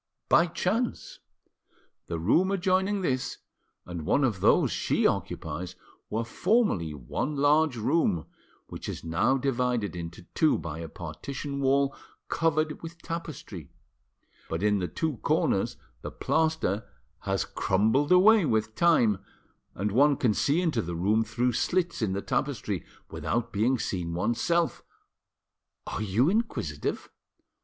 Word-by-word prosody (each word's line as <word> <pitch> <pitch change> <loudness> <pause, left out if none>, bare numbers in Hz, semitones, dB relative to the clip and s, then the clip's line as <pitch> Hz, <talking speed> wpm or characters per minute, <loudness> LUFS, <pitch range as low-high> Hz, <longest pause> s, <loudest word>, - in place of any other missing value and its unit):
"By 170 - +5
chance. 215 +8 -2 0.9
The 85 - -3
room 115 - +3
adjoining 190 +1 +1
this 130 -7 -1 0.5
and 85 -3 -6
one 140 - +2
of 115 -8 +1
those - - +4
she - - 0
occupies 85 +4 -2 0.3
were 110 +2 -1
formerly 175 - +1
one 75 - -3
large 145 -1 +3
room, 110 - +1 0.4
which - - -7
is - - -6
now 85 +11 +2
divided 125 -6 0
into 85 0 -7
two 155 - +3
by 80 -1 -6
a 80 -1 -6
partition 140 - -6
wall 135 0 +2 0.3
covered 155 -1 0
with 170 +1 -9
tapestry; 155 - -6 0.8
but 80 +4 -2
in 105 -1 +3
the 90 - -1
two 155 - -2
corners - - +1 0.2
the - - -5
plaster 160 - 0 0.3
has - - -1
crumbled 110 - +1
away 200 +3 +7
with 110 -6 0
time, 120 - +3 0.6
and 100 +2 -1
one 140 +5 +4
can 115 -4 +2
see 145 - +2
into 155 -10 +1
the 85 -3 -5
room 105 +6 +2
through 125 +2 0
slits 175 +6 0
in 100 -4 0
the 100 - -3
tapestry - - -2 0.3
without 115 +1 -2
being 115 +6 +2
seen 85 -6 -3
oneself. 120 - 0 1.0
Are - - -4
you 110 +6 +2
inquisitive?" 175 - -2
125 Hz, 130 wpm, -28 LUFS, 95-160 Hz, 1.0 s, away